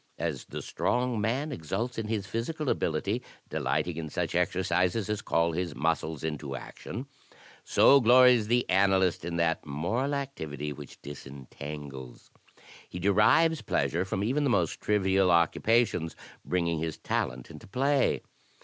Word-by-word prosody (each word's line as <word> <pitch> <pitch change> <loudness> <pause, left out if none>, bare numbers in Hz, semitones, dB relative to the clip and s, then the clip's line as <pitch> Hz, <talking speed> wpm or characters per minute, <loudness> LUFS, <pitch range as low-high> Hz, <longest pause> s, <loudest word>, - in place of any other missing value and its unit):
"^ - - -39
As 75 -5 -3
the - - -7
strong 125 -2 0
man 130 +8 -1
exults 115 - -3
in 110 - -3
his 105 -3 -2
physical 130 - -3
ability, 100 +9 0 0.3
delighting 85 -2 -1
in 80 -2 -4
such - - -2
exercises 90 +3 +1
as 105 0 -2
call 85 -5 +1
his 85 -2 -3
muscles 80 -1 -1
into 75 -3 -4
action, 120 - -7 0.6
so 140 - +6
glories 125 -2 +6
the 120 +2 +2
analyst 95 -2 +3
in 85 0 -4
that 85 -1 +1
moral 110 - -1
activity 75 - -4
which 70 -1 -11
disentangles. 70 -1 -9 0.6
He - - -7
derives 105 - +4
pleasure 85 +3 0
from 95 0 -2
even 135 +7 +1
the 140 - +2
most 120 - 0
trivial 95 -2 +2
occupations 85 +1 +2 0.3
bringing 85 -3 0
his 80 -1 -3
talent 60 -1 -3
into - - -12
play. 135 +6 +1
95 Hz, 140 wpm, -28 LUFS, 80-120 Hz, 0.6 s, so